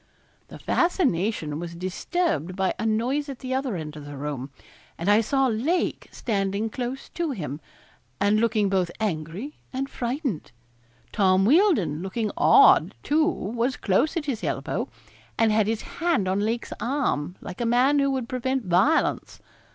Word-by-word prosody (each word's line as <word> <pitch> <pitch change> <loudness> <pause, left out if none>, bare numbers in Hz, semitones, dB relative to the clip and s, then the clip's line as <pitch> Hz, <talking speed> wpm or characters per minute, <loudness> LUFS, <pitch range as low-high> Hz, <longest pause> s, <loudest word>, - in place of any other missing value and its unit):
The - - -10
fascination 210 - 0
was 170 0 -6
disturbed 185 - -2
by 190 -1 0
a 225 - 0
noise 255 +7 0
at 270 - -6
the 260 0 -4
other 260 -5 -1
end 155 -2 -6
of 150 -1 -9
the 145 -1 -8
room, 140 -2 -4 0.5
and 170 - -4
I 205 +2 +5
saw 270 +4 +1
Lake 265 +10 0
standing 200 0 -1
close 250 +3 -5
to 340 -2 -2
him, 155 - -5 0.6
and 205 +2 +3
looking 220 -2 +2
both 190 -3 +1
angry 190 - -4
and 270 +1 -2
frightened. 250 - -3 0.6
Tom 190 -1 +3
Wealdon 270 - +3
looking 210 +3 -2
odd, 405 -2 +6
too, 310 +2 +2
was 240 - -1
close 225 - +1
at 310 - -2
his 250 -9 -3
elbow, 140 -3 -2 0.5
and 225 -1 +3
had 215 -1 +2
his 220 0 -1
hand 335 - 0
on 190 +2 +1
Lake's 225 +3 -2
arm, 220 - -1
like 180 - -8
a - - 0
man 255 +5 +4
who 275 0 +2
would 260 -3 -2
prevent 255 -1 -2
violence. 185 - +2
220 Hz, 160 wpm, -25 LUFS, 185-270 Hz, 0.6 s, odd